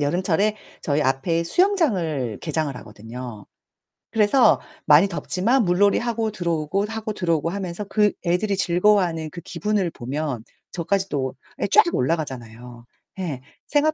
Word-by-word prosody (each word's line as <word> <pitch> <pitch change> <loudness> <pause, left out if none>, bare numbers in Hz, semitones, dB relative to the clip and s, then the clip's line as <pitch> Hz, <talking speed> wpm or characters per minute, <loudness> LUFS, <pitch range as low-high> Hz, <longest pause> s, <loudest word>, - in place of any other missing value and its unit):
여름철에 185 +7 +1 0.3
저희 145 0 +1
앞에 145 +5 0
수영장을 175 - +1
개장을 155 -4 -2
하거든요. 115 0 -9 0.7
그래서 225 +4 +4 0.3
많이 155 +6 +6
덥지만 210 +7 +1
물놀이하고 215 +5 +2
들어오고, 170 0 -1
하고 220 0 -4
들어오고 165 -4 0
하면서 185 0 -4
그 210 +1 +2
애들이 190 +4 +1
즐거워하는 175 -3 +2
그 175 - -8
기분을 205 +1 -1
보면 135 -2 -4 0.3
저까지 190 +3 0
또 130 -3 -2 0.3
예 - - +1
쫙 425 - +6
올라가잖아요. 125 -5 -3 0.3
예. 155 -9 -4 0.3
생활 305 +1 +2
170 Hz, 325 characters per minute, -23 LUFS, 145-205 Hz, 0.7 s, 많이